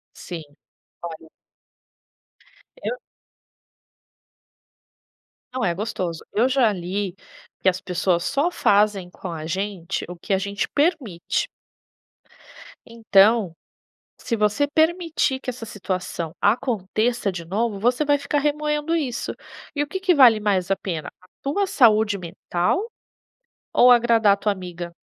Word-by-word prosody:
Sim. 170 -3 -7 0.6
Olha 160 -1 -8 1.5
Eu - - -3 2.6
Não 255 -1 -2
é 175 -2 +1
gostoso. 190 -5 -4
Eu 235 +5 +3
já 255 -5 +3
li 185 +1 -3 0.5
que - - +2
as 185 0 +1
pessoas 180 -1 0
só 290 +5 +1
fazem 205 - +2
com 185 0 -8
a 160 -2 -6
gente 190 0 -3
o 180 - -7
que 170 - -5
a 190 - +4
gente 200 +1 -2
permite. 285 - 0 1.4
Então, 220 -4 +3 0.7
se 230 - -2
você 210 +7 +1
permitir 315 -3 +1
que 265 - -6
essa 240 -2 -6
situação 185 -5 -4
aconteça 220 0 +1
de 170 -2 -7
novo, 205 +3 -1
você 245 +7 +2
vai 290 -1 +3
ficar 285 +1 -1
remoendo 300 +2 0
isso. 270 -7 -2 0.4
E 290 - 0
o - - -7
que 380 +5 -4
que 375 -1 +3
vale 250 -8 +7
mais 200 -3 0
a 195 - +3
pena, 165 -6 -5
a 185 - -21
tua 300 +9 0
saúde 220 - +4
mental 180 - -1 0.9
ou 250 - +6
agradar 230 -4 +5
tua 210 - 0
amiga? 175 -2 -7
210 Hz, 125 wpm, -23 LUFS, 185-265 Hz, 2.6 s, vale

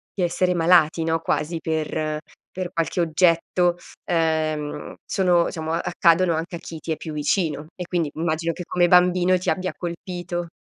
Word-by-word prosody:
di 185 - -1
essere 180 +1 +1
malati 165 -1 +4
no, 165 0 +1
quasi 165 +1 -1
per 155 -1 -2 0.4
per 185 -1 -3
qualche 165 +1 0
oggetto, 170 +1 +2 0.4
uhm, 155 -2 -1
sono 180 -3 +2
diciamo 160 0 -4
accadono 170 0 +3
anche 165 +3 -3
a - - -6
chi 160 -1 -8
ti 165 - -5
è 160 - -1
più 155 +1 -7
vicino, 150 0 -1
e 180 - -5
quindi 170 -4 -1
immagino 165 0 -1
che 180 - -7
come 175 0 +2
bambino 180 +1 +4
ti 180 - -1
abbia 185 0 -2
colpito. 175 0 -5
170 Hz, 165 wpm, -23 LUFS, 160-180 Hz, 0.4 s, malati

